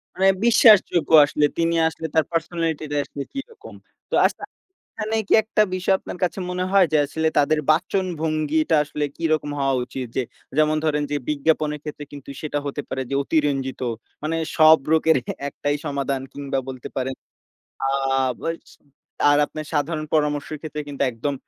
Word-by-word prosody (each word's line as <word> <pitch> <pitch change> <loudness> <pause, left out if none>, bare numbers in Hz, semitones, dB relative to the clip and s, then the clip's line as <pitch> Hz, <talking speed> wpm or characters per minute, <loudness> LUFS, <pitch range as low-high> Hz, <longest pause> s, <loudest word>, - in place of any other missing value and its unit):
মানে 190 +1 +3 0.2
বিশ্বাসযোগ্য 210 -9 +5
আসলে। 150 +1 +1
তিনি 170 0 +1
আসলে 160 0 -4
তার 160 -3 +4
পার্সোনালিটিটা 165 -3 -2
আসলে 140 - -6
কিরকম। 415 - -9 0.3
তো - - -1
আচ্ছা - - -1 0.5
এখানে 220 +1 -3
কি - - 0
একটা 215 0 +2
বিষয় 185 +1 +1
আপনার - - -8
কাছে 180 - -2
মনে 180 0 -2
হয় 195 -3 +6
যে - - +4
আসলে 160 +2 -2
তাদের 150 +2 +3
বাচনভঙ্গিটা 160 -3 0
আসলে 150 0 -3
কিরকম 155 -3 0
হওয়া 135 -1 +2
উচিত? 130 0 -6
যে 130 - +2 0.4
যেমন 155 0 +3
ধরেন 150 -1 +1
যে 145 - 0
বিজ্ঞাপনের 150 0 0
ক্ষেত্রে 150 -1 -6
কিন্তু 140 -1 -10
সেটা 145 -1 -2
হতে 140 +1 -3
পারে 130 - -3
যে - - -1
অতিরঞ্জিত। 140 -4 -1 0.4
মানে 160 +2 -1 0.2
সব 155 0 +7
রোগের 160 -1 +4 0.3
একটাই 145 +1 -2
সমাধান 140 -1 -2
কিংবা 140 -1 -3
বলতে 130 -2 -7
পারেন। 130 0 -2 0.7
আ - - +2 0.5
বস 165 0 -5 0.6
আর 145 - +5
আপনার 155 0 -7
সাধারণ 155 +1 -1
পরামর্শের 150 0 0
ক্ষেত্রে 150 -1 -5
কিন্তু 140 -1 -2
একদম 140 +5 -3
155 Hz, 155 wpm, -22 LUFS, 145-165 Hz, 0.7 s, সব